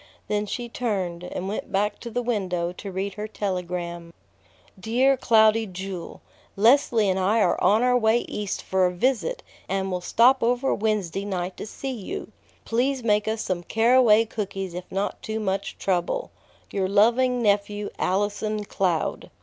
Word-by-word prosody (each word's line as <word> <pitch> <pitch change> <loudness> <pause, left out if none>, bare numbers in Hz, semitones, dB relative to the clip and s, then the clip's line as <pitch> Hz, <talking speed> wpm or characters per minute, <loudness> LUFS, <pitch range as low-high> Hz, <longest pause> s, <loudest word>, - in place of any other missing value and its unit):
Then 210 0 -1
she 240 +4 -4
turned, 190 -8 -3
and 180 +1 -5
went 205 - -4
back 205 +1 0
to 235 - -7
the 245 +2 -2
window 185 -7 -1
to 195 +2 -8
read 190 +1 -3
her 210 +1 -5
telegram. 180 -4 -4 0.7
"DEAR 250 +7 +3
CLOUDY 220 -3 +4
JEWEL: 185 -2 -7 0.3
Leslie 230 0 +4
and 190 0 +1
I 200 +5 +2
are 180 -5 +2
on 210 +5 +4
our 250 0 +3
way 230 0 +3
East 205 -2 -4
for 190 -1 +2
a - - -2
visit, 265 - 0 0.3
and 190 0 -1
will 180 -1 -2
stop 235 +8 +4
over 245 +3 +1
Wednesday 200 -4 -1
night 185 -2 -3
to - - -6
see 270 +5 -5
you. 255 - -6 0.3
Please 255 +2 0
make 210 -2 +2
us 220 0 -1
some 185 -2 -2
caraway 225 +2 +4
cookies 195 -4 -4
if 180 +1 -8
not 195 +2 -2
too 220 -3 -3
much 195 -2 -2
trouble. 190 - -1 0.4
"Your 190 -2 -1
loving 240 +4 +3
nephew, 205 0 0
"ALLISON 205 +2 -1
CLOUD." 180 -5 -1
210 Hz, 160 wpm, -25 LUFS, 190-230 Hz, 0.7 s, CLOUDY